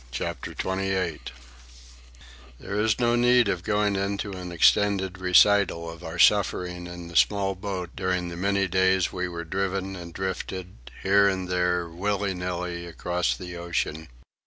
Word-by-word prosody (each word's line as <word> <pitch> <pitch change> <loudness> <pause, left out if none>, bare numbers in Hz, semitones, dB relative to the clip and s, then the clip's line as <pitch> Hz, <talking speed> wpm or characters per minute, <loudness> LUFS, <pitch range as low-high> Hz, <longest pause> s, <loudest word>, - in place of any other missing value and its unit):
CHAPTER - - -5
XXVIII 95 -3 -2 1.4
There - - -7
is 110 -1 +2
no 120 -1 +3
need 120 -1 +4
of 90 -3 -1
going 105 -1 +1
into 100 +1 -2
an 90 -2 -7
extended 95 +2 +3
recital 90 -2 +4
of 85 +1 -12
our 80 0 -6
suffering 90 -2 +2
in 85 -1 -8
the 85 - -11
small 100 +2 +3
boat 95 -2 -5
during 90 -1 -1
the 85 - -7
many 100 +2 +1
days 95 0 +2
we 90 0 -2
were 85 -1 -6
driven 95 +2 -2
and 85 -2 -8
drifted, 95 -7 -5
here 100 +1 +5
and 95 -2 -1
there, 90 -1 0
willy 100 +3 -1
nilly, 90 -1 -4
across 90 +1 -1
the 90 -2 -8
ocean. 85 -2 -3
95 Hz, 150 wpm, -26 LUFS, 90-100 Hz, 1.4 s, here